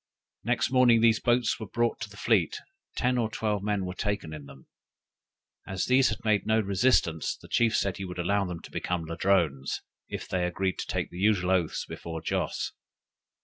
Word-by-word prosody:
Next - - +1
morning 125 -3 +5
these 115 -1 +5
boats 120 -1 +1
were 110 - -6
brought 120 +3 0
to - - -4
the - - -14
fleet; 440 - +2 0.4
ten 125 0 +1
or 110 -2 0
twelve 105 -2 -1
men 100 -2 -1
were 90 - -4
taken 100 -5 -3
in 75 -2 -8
them. 70 -1 -14 1.0
As 95 -1 -2
these 130 0 +4
had 110 - -5
made 105 -2 +2
no 110 0 +3
resistance, 100 - +1
the - - -15
chief 115 -2 +2
said 100 -2 0
he 95 - -5
would 90 -1 -7
allow 100 +3 +1
them 90 -2 -5
to - - -12
become 90 -2 -2
Ladrones, 85 -5 0 0.3
if - - -5
they 90 -1 0
agreed 95 +1 -2
to - - -4
take - - -2
the 90 - -8
usual 95 -3 +2
oaths 90 -4 0
before 80 -1 -6
Joss. 80 - -2
100 Hz, 190 wpm, -28 LUFS, 90-115 Hz, 1.0 s, morning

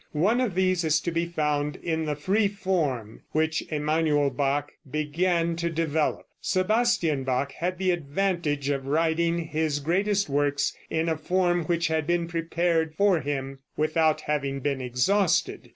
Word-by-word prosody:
One 215 +10 +3
of 225 -8 -1
these 185 -1 +2
is 155 -1 +3
to 170 - -2
be 170 +1 -1
found 150 -3 -1
in 160 -1 -2
the 150 -1 -1
free 195 +8 +1
form 165 - -2
which 160 0 +1
Emanuel 150 -1 +1
Bach 140 +2 -1 0.2
began 165 +4 0
to 170 0 -1
develop. 160 -2 -1 0.2
Sebastian 185 - +1
Bach 130 +2 -1
had 180 +5 -3
the 185 0 +1
advantage 160 -3 -1
of 135 -1 -2
writing 165 +3 +1
his 155 -1 0
greatest 195 +7 +1
works 145 0 0
in 160 +1 0
a 160 - +1
form 175 +1 +1
which 170 +1 0
had 160 -1 -1
been 175 -1 +1
prepared 165 -1 0
for 200 -3 +3
him, 135 -1 -4 0.2
without 155 0 +2
having 140 -2 -2
been 135 -1 -1
exhausted. 130 +10 +1
160 Hz, 150 wpm, -26 LUFS, 145-175 Hz, 0.2 s, One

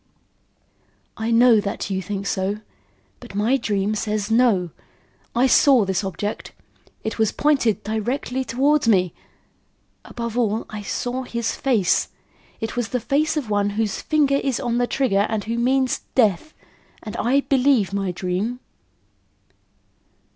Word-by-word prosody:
"I 220 +1 -3
know 235 -1 +6
that 200 0 -4
you 190 0 -1
think 200 +1 -5
so; 195 +2 -1 0.6
but 240 -5 -12
my 220 +6 +2
dream 210 -5 -1
says 215 0 -2
no. 220 -8 +3 0.6
I 245 +2 +4
saw 265 -3 +5
this 190 +1 -1
object. 195 +2 -4 0.5
It 220 - -4
was 220 -1 +2
pointed 275 -8 +1
directly 245 +4 -2
towards 275 +3 +1
me 185 -6 +3 0.9
above 235 0 -4
all, 220 -1 0
I 215 -1 -5
saw 245 +5 -3
his 235 -3 -3
face. 225 -10 +1 0.5
It 225 0 -4
was 240 -2 -1
the 250 - -1
face 300 +6 0
of 250 -8 -3
one 205 0 +1
whose 215 -2 -1
finger 290 -3 +2
is 270 -3 -1
on 240 -2 -1
the 245 - +1
trigger 210 -8 +1
and 220 -2 -2
who 230 +2 -3
means 260 +1 +1 0.2
death; 230 - +2 0.5
and 215 - -7
I 270 +4 +2
believe 260 -8 +2
my 195 -2 -1
dream." 185 +7 -3
225 Hz, 140 wpm, -22 LUFS, 205-255 Hz, 0.9 s, know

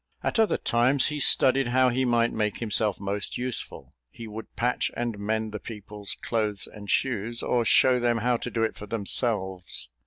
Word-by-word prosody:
At - - 0
other 220 - +3
times, 125 +4 +2
he 150 -1 -3
studied 135 -1 +3
how 130 +1 +3
he 130 +2 0
might 120 -1 +2
make 105 -2 -1
himself 105 -3 +1
most 100 0 -3
useful. 125 -1 -4 0.2
He 115 - -10
would 110 +1 -9
patch 125 +1 0
and 120 -3 -2
mend 110 +1 -2
the 105 - -5
people's 105 -2 -5
clothes 105 -4 -1
and 100 -2 -11
shoes, 115 -2 0
or 120 -1 +1
show 125 +2 +5
them 120 -1 +1
how 120 +2 +1
to 125 - -5
do 115 -1 -1
it 110 - -1
for 105 - -9
themselves. 100 - -1
115 Hz, 185 wpm, -26 LUFS, 105-125 Hz, 0.2 s, show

